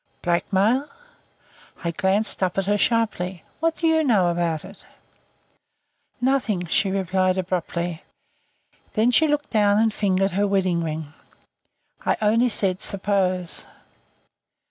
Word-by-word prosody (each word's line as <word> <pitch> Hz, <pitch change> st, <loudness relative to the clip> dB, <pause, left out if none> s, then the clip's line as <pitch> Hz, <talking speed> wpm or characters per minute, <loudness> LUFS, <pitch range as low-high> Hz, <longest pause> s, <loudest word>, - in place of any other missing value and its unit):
"Blackmail 200 Hz, +10 st, +1 dB, 0.4 s
?" -, -, -25 dB
I 170 Hz, -, -1 dB
glanced 195 Hz, +5 st, 0 dB
up 185 Hz, -1 st, 0 dB
at 195 Hz, -, +1 dB
her 205 Hz, +1 st, +2 dB
sharply. 195 Hz, -7 st, 0 dB, 0.2 s
"What 330 Hz, 0 st, +1 dB
do 335 Hz, -, -3 dB
you 320 Hz, -1 st, +3 dB
know 205 Hz, -10 st, +3 dB
about 170 Hz, -2 st, -1 dB
it?" -, -, -13 dB, 1.4 s
"Nothing," 245 Hz, -8 st, 0 dB
she 195 Hz, +4 st, +1 dB
replied 185 Hz, -1 st, 0 dB
abruptly. 175 Hz, -2 st, -2 dB, 0.9 s
Then 225 Hz, +3 st, +3 dB
she 315 Hz, +6 st, +4 dB
looked 295 Hz, 0 st, -1 dB
down 205 Hz, -2 st, +3 dB
and 220 Hz, 0 st, +2 dB
fingered 195 Hz, -2 st, +1 dB
her 200 Hz, +3 st, +1 dB
wedding 185 Hz, -4 st, +1 dB
ring. 155 Hz, -2 st, -5 dB, 0.9 s
"I -, -, +1 dB
only 225 Hz, +3 st, +3 dB
said 190 Hz, -3 st, 0 dB
'suppose.'" 190 Hz, -3 st, -1 dB
195 Hz, 125 wpm, -23 LUFS, 180-220 Hz, 1.4 s, she